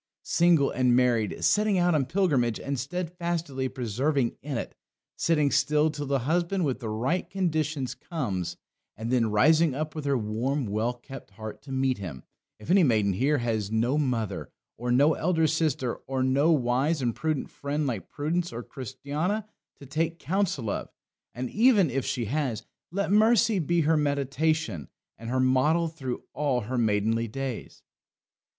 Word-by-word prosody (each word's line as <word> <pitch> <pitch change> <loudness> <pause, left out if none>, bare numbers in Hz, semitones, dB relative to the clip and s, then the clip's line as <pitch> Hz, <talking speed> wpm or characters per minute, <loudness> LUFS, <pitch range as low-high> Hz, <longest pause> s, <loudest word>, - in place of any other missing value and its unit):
Single 170 -5 +3
and 125 -2 +3
married; 120 -4 +1
setting 210 -2 +3
out 175 -1 +3
on 140 -5 +1
pilgrimage 140 - +1
and 140 -2 -3
steadfastly 170 -2 -3
persevering 130 +2 -1
in 140 -2 -4
it; - - -5 0.4
sitting 150 -4 +2
still 150 +3 +3
till 145 -2 -5
the 140 0 +2
husband 175 +3 +1
with 135 -3 -1
the 115 -4 -5
right 125 +12 -1
conditions 155 -8 -1
comes, 125 - -4 0.4
and 115 +3 -4
then 115 -3 +3
rising 155 +7 +4
up 155 +1 -3
with 155 -2 -6
her 140 -1 +2
warm, 120 +6 -1
well 110 +4 -1
kept 135 +1 -11
heart 110 +2 -8
to 135 - -11
meet 130 -3 0
him 85 -10 -7 0.3
if 105 - -5
any 195 +1 +6
maiden 110 - +3
here 140 +9 +2
has 110 -5 -1
no 115 +5 +1
mother, 120 -9 -1 0.3
or 120 +1 -3
no 145 +6 +5
elder 160 0 +1
sister, 155 -6 0
or 130 -1 -1
no 140 +5 +3
wise 135 +2 +2
and 120 -2 +1
prudent 155 -3 -2
friend 145 +2 -2
like 115 -10 -3
Prudence 165 +4 -2
or 120 +1 -6
Christiana 145 - -3 0.3
to 140 - -13
take 160 +4 -1
counsel 175 - -1
of - - -4 0.5
and 125 +2 -3
even 215 - +4
if 135 0 -2
she 120 -4 -1
has 125 -3 -2 0.3
let 200 +1 -1
Mercy 220 0 +4
be 170 +1 +1
her 160 +1 +3
meditation 145 - 0 0.3
and 115 0 -7
her 130 +1 0
model 130 +6 +3
through 135 -6 -5
all 140 -3 0
her 125 +4 -3
maidenly 110 +1 +1
days. 130 +1 -6
140 Hz, 165 wpm, -27 LUFS, 120-160 Hz, 0.5 s, any